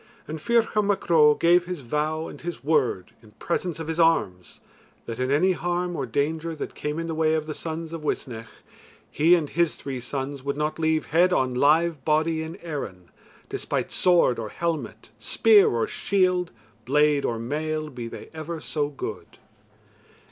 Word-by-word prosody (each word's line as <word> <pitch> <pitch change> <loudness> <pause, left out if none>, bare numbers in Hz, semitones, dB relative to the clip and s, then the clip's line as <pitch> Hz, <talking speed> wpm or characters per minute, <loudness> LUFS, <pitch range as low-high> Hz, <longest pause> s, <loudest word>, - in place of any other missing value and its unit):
And 155 0 -6
Ferchar 230 +1 +2
Mac 205 -1 -1
Ro 150 -2 +6
gave 175 +1 +4
his 180 -4 -5
vow 150 +5 -2
and - - -10
his 175 -3 -6
word 140 - +1
in 105 -2 -19
presence 170 +6 -3
of 160 - -5
his 160 +1 -3
arms 100 - +1 0.5
that, 115 0 -6
in 130 0 0
any 160 +7 +3
harm 175 0 -2
or 135 -4 -3
danger 160 +6 -1
that - - -6
came 150 +1 -4
in 165 - -2
the 165 - -3
way 160 0 +2
of 155 -1 -1
the 155 - -4
sons 160 +1 -5
of 165 - -5
Uisnech, 115 -6 -4 0.6
he 165 +4 +5
and 155 -4 -2
his 170 -1 +1
three 135 -2 -5
sons 135 +2 -4
would 140 +1 -3
not 150 +1 -2
leave 160 -1 +1
head 180 +3 +5
on 130 -6 +1
live 150 +3 +3
body 160 +2 +1
in 160 +1 -6
Erin, 105 - -6 0.4
despite - - -3
sword 175 -9 +3
or 110 -2 -4
helmet, 160 -9 -4
spear 210 - +5
or 115 -1 0
shield, 180 -3 +1 0.3
blade 150 +3 +3
or 115 - -1
mail, 155 +5 -3
be 120 -3 -6
they - - -9
ever 160 +1 -5
so 150 -1 -2
good. 140 - -7
155 Hz, 175 wpm, -25 LUFS, 140-170 Hz, 0.6 s, Ro